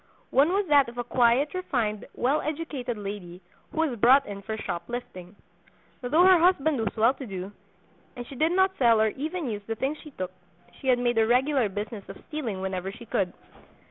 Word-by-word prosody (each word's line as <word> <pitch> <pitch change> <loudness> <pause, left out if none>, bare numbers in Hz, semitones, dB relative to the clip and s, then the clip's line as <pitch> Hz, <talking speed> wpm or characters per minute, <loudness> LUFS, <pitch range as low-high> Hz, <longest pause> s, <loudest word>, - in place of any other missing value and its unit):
One 280 +4 +4
was 395 +2 +1
that 285 -4 +5
of 240 - -13
a 245 - -1
quiet, 245 +4 +2
refined, 235 - -2
well 275 +5 +1
educated 290 -6 -4
lady, 195 -4 -7 0.3
who 320 - -1
was 270 -8 -1
brought 265 +5 +6
in 200 -1 -7
for 220 +2 -5
shop 170 -5 -4
lifting. 185 -7 -7 0.7
Though 300 +8 +3
her 370 -1 +7
husband 315 -5 +3
was 220 0 -2
well 230 +4 +4
to 265 -2 -9
do, 190 -1 -6 0.6
and 245 - -6
she 275 - -11
did 315 +5 +1
not 380 +1 +3
sell 230 -4 +5
or 220 0 +4
even 310 - -4
use 210 -3 -3
the 225 - -2
things 275 +6 -2
she 305 - -11
took, 185 -9 -5 0.5
she 265 - -7
had 255 -1 +5
made 240 -1 +1
a 220 - +3
regular 255 -1 +2
business 205 +1 -6
of - - -8
stealing 240 -11 -4
whenever 190 0 -3
she 235 +4 -12
could. 190 -4 -1
245 Hz, 205 wpm, -26 LUFS, 210-290 Hz, 0.7 s, her